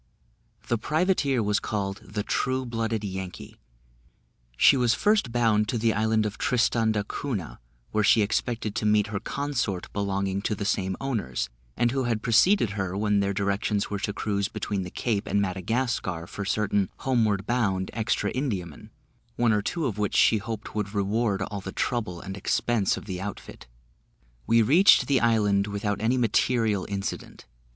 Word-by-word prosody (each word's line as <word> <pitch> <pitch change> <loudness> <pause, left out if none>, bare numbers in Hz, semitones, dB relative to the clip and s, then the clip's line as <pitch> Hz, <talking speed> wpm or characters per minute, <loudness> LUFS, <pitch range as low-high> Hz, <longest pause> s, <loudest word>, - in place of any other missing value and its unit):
The 120 - 0
privateer 150 - +1
was 105 0 +1
called 100 -2 -3
the 105 0 -5
True 130 +4 -1
blooded 115 -2 -2
Yankee. 95 -2 -6 1.0
She - - +6
was 120 -3 +2
first 205 - +2
bound 110 -3 +2
to 120 - 0
the 115 0 +2
island 110 0 +1
of 105 0 -4
Tristan 120 -4 +2
d'Acunha, 105 - -3 0.3
where 105 0 +1
she 110 +1 +5
expected 110 0 -1
to 105 - -2
meet 105 -1 +4
her 100 - -1
consort, 125 -7 -3
belonging 100 -1 -1
to 105 - -1
the 100 - -4
same 95 -2 -1
owners, 105 - -2 0.3
and 120 0 +2
who 135 -1 -1
had 115 -3 -1
preceded 125 - +4
her 95 -2 -3
when 105 0 +2
their 100 0 +1
directions 100 +1 -1
were 100 - -2
to 100 - -2
cruise 100 -1 -1
between 100 -1 -3
the 90 - -5
Cape 105 +1 -2
and 100 - +1
Madagascar, 95 -2 -1
for 100 +3 -6
certain 100 -1 0 0.2
homeward 110 -7 +1
bound 105 -6 0
extra 110 0 0
Indiamen, 100 - -4 0.5
one 120 -2 +2
or 105 - +2
two 165 - -2
of 105 -5 -2
which 105 -1 -1
she 110 - +5
hoped 110 +1 -6
would 105 -1 -3
reward 100 0 0
all 100 0 -5
the 95 - -6
trouble 100 -8 -2
and 95 0 -6
expense 100 +1 0
of - - -8
the 95 -3 -5
outfit. 100 -8 -8 0.8
We 115 0 +5
reached 165 - +6
the 140 -2 +2
island 105 -3 +2
without 100 0 -2
any 120 +4 +2
material 115 -3 +1
incident. 100 -1 -5
105 Hz, 165 wpm, -26 LUFS, 100-120 Hz, 1.0 s, She